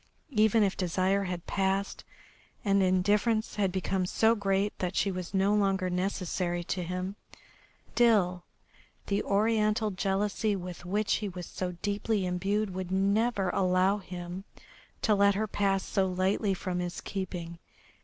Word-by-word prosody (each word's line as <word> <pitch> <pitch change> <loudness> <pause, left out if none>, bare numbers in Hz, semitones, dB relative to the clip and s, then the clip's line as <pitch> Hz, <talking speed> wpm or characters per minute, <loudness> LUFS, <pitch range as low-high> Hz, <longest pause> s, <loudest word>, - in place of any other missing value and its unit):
Even 220 0 +4
if 195 -2 +1
desire 185 +2 +1
had 180 -2 -4
passed 195 0 -1 0.6
and 200 -1 +3
indifference 205 +5 +2
had 195 -3 +1
become 185 0 -1
so 220 +4 +3
great 200 -1 0
that 180 0 -2
she 200 - +1
was 180 -2 -5
no 195 +1 +2
longer 195 -3 +1
necessary 180 -1 -1
to 180 +2 -3
him, 180 +3 -4 0.8
still 195 -7 +3 0.6
the 200 0 0
Oriental 215 +1 +1
jealousy 200 +2 0
with 180 -1 -7
which 200 +3 +1
he 210 - -3
was 180 -1 -7
so 180 +1 -4
deeply 205 0 0
imbued 195 +3 -1
would 185 -1 -4
never 200 +1 +1
allow 185 +2 +2
him 180 0 -7 0.6
to 215 - +4
let 200 0 +4
her 215 +2 0
pass 195 -2 0
so 195 -1 0
lightly 190 +2 0
from 180 0 -3
his 175 -1 -3
keeping. 175 -3 -5
195 Hz, 145 wpm, -29 LUFS, 185-205 Hz, 0.8 s, Even